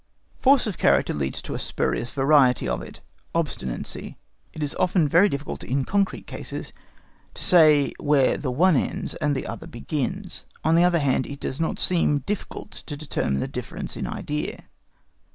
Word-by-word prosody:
Force 275 Hz, 0 st, +5 dB
of 210 Hz, -5 st, -4 dB
character -, -, +3 dB
leads 70 Hz, -2 st, -2 dB
us -, -, +1 dB
to -, -, -5 dB
a -, -, -3 dB
spurious 120 Hz, -, -1 dB
variety 135 Hz, -2 st, +3 dB
of -, -, -1 dB
it—OBSTINACY. 140 Hz, -, -5 dB, 0.4 s
It 155 Hz, -, -5 dB
is 145 Hz, -, 0 dB
often 175 Hz, -3 st, +3 dB
very 175 Hz, +8 st, +5 dB
difficult 140 Hz, -1 st, -5 dB
in 135 Hz, +1 st, -1 dB
concrete 200 Hz, -1 st, 0 dB
cases -, -, -5 dB, 0.6 s
to -, -, -2 dB
say 155 Hz, -5 st, +6 dB
where 145 Hz, -3 st, +3 dB
the 140 Hz, -, -3 dB
one 165 Hz, +7 st, +4 dB
ends -, -, -1 dB
and 150 Hz, -2 st, 0 dB
the 135 Hz, -, -3 dB
other 165 Hz, -, -7 dB
begins; 160 Hz, -, -3 dB, 0.2 s
on 160 Hz, -, +3 dB
the 170 Hz, +1 st, +5 dB
other 175 Hz, -1 st, +4 dB
hand, 135 Hz, -4 st, +1 dB
it 140 Hz, 0 st, -7 dB
does 130 Hz, -, -3 dB
not 165 Hz, -, -1 dB
seem 165 Hz, -5 st, +2 dB
difficult 205 Hz, +6 st, -5 dB
to 145 Hz, -, -8 dB
determine 70 Hz, -, -1 dB
the -, -, -2 dB
difference -, -, -5 dB
in -, -, -4 dB
idea. 150 Hz, +1 st, -4 dB
150 Hz, 170 wpm, -24 LUFS, 135-175 Hz, 0.6 s, say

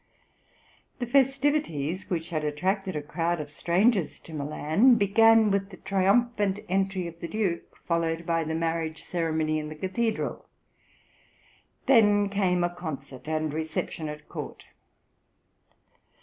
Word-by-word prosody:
The 245 Hz, -, -2 dB
festivities 265 Hz, -, +1 dB
which 170 Hz, -3 st, -2 dB
had 155 Hz, -2 st, -1 dB
attracted 185 Hz, +5 st, -1 dB
a 150 Hz, -, -3 dB
crowd 170 Hz, +3 st, -1 dB
of 150 Hz, -1 st, -6 dB
strangers 185 Hz, +4 st, +1 dB
to 165 Hz, -, -12 dB
Milan 155 Hz, -, +3 dB
began 225 Hz, +1 st, +5 dB
with 195 Hz, 0 st, 0 dB
the 185 Hz, -, -11 dB
triumphant 200 Hz, +1 st, +1 dB
entry 190 Hz, 0 st, 0 dB
of 170 Hz, 0 st, -8 dB
the 170 Hz, -, -5 dB
Duke, 190 Hz, -4 st, -2 dB
followed 165 Hz, -1 st, 0 dB
by 165 Hz, -1 st, +1 dB
the 160 Hz, 0 st, -3 dB
marriage 165 Hz, -1 st, -2 dB
ceremony 160 Hz, -2 st, -1 dB
in 150 Hz, 0 st, -5 dB
the 155 Hz, -, -7 dB
cathedral; 215 Hz, +7 st, -2 dB, 1.4 s
then 205 Hz, -5 st, +5 dB
came 185 Hz, -3 st, +1 dB
a 175 Hz, 0 st, 0 dB
concert 140 Hz, -6 st, -7 dB
and 155 Hz, -1 st, -1 dB
reception 160 Hz, 0 st, -3 dB
at 150 Hz, 0 st, -9 dB
court. -, -, -7 dB
175 Hz, 130 wpm, -27 LUFS, 160-205 Hz, 1.4 s, began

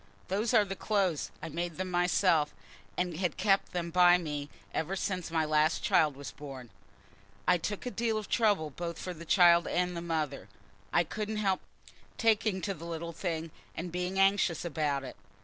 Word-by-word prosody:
"Those 210 Hz, +5 st, 0 dB
are 215 Hz, -2 st, +6 dB
the 195 Hz, 0 st, -4 dB
clothes. 195 Hz, -7 st, 0 dB
I 165 Hz, -, -4 dB
made 170 Hz, +1 st, -4 dB
them 185 Hz, 0 st, -3 dB
myself, 175 Hz, -3 st, +2 dB, 0.4 s
and 180 Hz, -3 st, -1 dB
had 180 Hz, -2 st, -1 dB
kept 195 Hz, 0 st, +2 dB
them 170 Hz, -1 st, -3 dB
by 180 Hz, 0 st, +6 dB
me 150 Hz, -4 st, -4 dB, 0.2 s
ever 170 Hz, +5 st, -1 dB
since 185 Hz, -2 st, -2 dB
my 160 Hz, -1 st, +1 dB
last 155 Hz, +1 st, +2 dB
child 150 Hz, -3 st, +3 dB
was 140 Hz, 0 st, -7 dB
born. 135 Hz, -5 st, -9 dB, 0.8 s
I 180 Hz, -1 st, +4 dB
took 205 Hz, +7 st, -4 dB
a 250 Hz, -, -2 dB
deal 230 Hz, -2 st, 0 dB
of 215 Hz, -2 st, -4 dB
trouble 205 Hz, -10 st, +2 dB
both 170 Hz, +3 st, -5 dB
for 180 Hz, -, -5 dB
the 170 Hz, 0 st, -10 dB
child 170 Hz, -1 st, +6 dB
and 180 Hz, 0 st, 0 dB
the 170 Hz, -, -3 dB
mother. 155 Hz, -5 st, -3 dB, 0.4 s
I 175 Hz, -, +4 dB
couldn't 215 Hz, +5 st, -4 dB
help 195 Hz, -3 st, +1 dB, 0.6 s
taking 215 Hz, -4 st, +2 dB
to 195 Hz, -, -2 dB
the 170 Hz, -2 st, -10 dB
little 170 Hz, 0 st, -5 dB
thing 165 Hz, -2 st, -3 dB, 0.2 s
and 175 Hz, +1 st, -5 dB
being 180 Hz, +2 st, -2 dB
anxious 195 Hz, -3 st, +3 dB
about 145 Hz, -4 st, -1 dB
it. 130 Hz, -, -8 dB
175 Hz, 185 wpm, -31 LUFS, 160-195 Hz, 0.8 s, are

